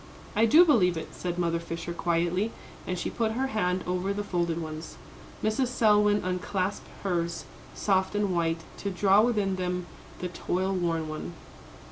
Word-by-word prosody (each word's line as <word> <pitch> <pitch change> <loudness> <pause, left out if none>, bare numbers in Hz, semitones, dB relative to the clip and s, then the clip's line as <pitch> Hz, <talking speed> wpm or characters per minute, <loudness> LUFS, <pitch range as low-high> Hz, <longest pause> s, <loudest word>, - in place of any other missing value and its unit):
"I 225 +2 +4
do 325 +10 +8
believe 185 - +4
it," 160 - -6
said 175 -1 -4
Mother 170 -1 +1
Fisher, 170 +1 -5
quietly, 175 +5 0 0.4
and 180 - -1
she - - -3
put 225 -2 0
her 260 +4 0
hand 180 -3 0
over 180 +2 -1
the 205 +1 -3
folded 170 -4 -1
ones. 155 0 -6 0.5
Mrs. 230 +5 +1
Selwyn 210 -4 +3
unclasped 185 +2 -2 0.2
hers, 170 -3 -1 0.3
soft 190 0 +1
and 205 -2 +1
white, 165 -1 0 0.2
to 200 - -3
draw 195 +2 +4
within 210 -5 +1
them 180 -1 -2 0.3
the 180 - -4
toil 185 +2 -1
worn 165 -3 0
one. 155 +2 -5
185 Hz, 160 wpm, -28 LUFS, 170-205 Hz, 0.5 s, do